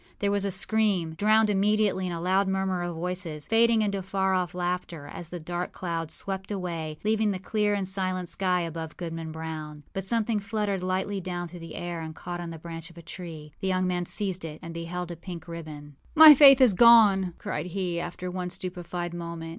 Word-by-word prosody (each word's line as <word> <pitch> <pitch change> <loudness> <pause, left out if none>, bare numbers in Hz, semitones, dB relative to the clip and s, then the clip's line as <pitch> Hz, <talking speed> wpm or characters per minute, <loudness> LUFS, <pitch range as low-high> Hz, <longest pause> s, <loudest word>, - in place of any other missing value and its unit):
There 200 -1 0
was 200 -1 +1
a - - 0
scream, 195 -3 +1
drowned 215 +4 +3
immediately 205 -1 +2
in - - -3
a 170 - -4
louder 190 +3 +2
murmur 190 -1 0
of 175 -1 -3
voices, 170 -3 -4
fading 225 +1 +4
into 200 -2 -1
far 190 0 0
off 180 -2 -1
laughter, 175 -3 -3
as 170 +2 -9
the 175 - -6
dark 175 +2 -4
cloud 165 -3 -3
swept 190 +2 -4
away, 170 -6 -4
leaving 215 0 +2
the 195 - -1
clear 205 +2 0
and 195 -2 -2
silent 185 -1 -2
sky 180 0 0
above 165 -1 -5
Goodman 165 -2 -5
Brown. 155 -2 -6
But 195 - -3
something 225 +1 0
fluttered 205 -2 -2
lightly 190 +2 -1
down 175 -1 -4
through 175 - -10
the 165 -1 -9
air 175 -1 -4
and 160 -1 -7
caught 175 +1 -6
on 170 - -5
the 165 - -7
branch 165 +1 -8
of 170 - -18
a 170 - -10
tree. 160 -3 -9
The 190 - -2
young 185 0 +1
man 180 -1 -1
seized 190 -4 -2
it, 155 -2 -6
and 165 0 -7
beheld 175 +1 -5
a - - -5
pink 170 0 -9
ribbon. 150 -4 -9 0.2
âMy 310 -1 +12
Faith 275 -1 +9
is 250 -6 +6
gone!â 200 -4 +6
cried - - -4
he, 180 -2 -2
after 180 +1 -5
one 180 0 -3
stupefied 175 -1 -4
moment. 170 -1 -6
180 Hz, 210 wpm, -27 LUFS, 170-195 Hz, 0.2 s, âMy